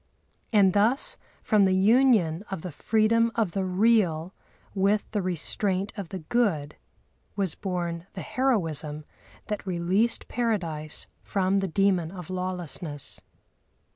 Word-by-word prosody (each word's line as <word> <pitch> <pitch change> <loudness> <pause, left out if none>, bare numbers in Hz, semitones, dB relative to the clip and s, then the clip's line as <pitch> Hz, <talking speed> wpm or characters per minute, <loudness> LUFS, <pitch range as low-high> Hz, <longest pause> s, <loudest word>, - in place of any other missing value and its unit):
And 200 -4 +5
thus, 250 - +2 0.3
from 210 -3 +4
the 190 0 +3
union 205 -5 +4
of 190 -4 -5
the 180 - -5
freedom 225 +6 +2
of 220 -6 +1
the 195 +2 -1
real 185 -3 +2 0.4
with 200 +2 +2
the 210 -2 0
restraint 185 +3 0
of 195 -5 -6
the 190 - -5
Good, 165 -6 0 0.6
was 195 -5 0
born 175 -2 -4
the 190 - -6
heroism 165 - -1 0.4
that 210 -1 -5
released 185 +6 +1
Paradise 170 -11 -2 0.2
from 195 0 +1
the 195 - -1
demon 185 -2 +1
of 180 -2 -8
Lawlessness. 180 -5 -4
190 Hz, 125 wpm, -26 LUFS, 170-215 Hz, 0.6 s, And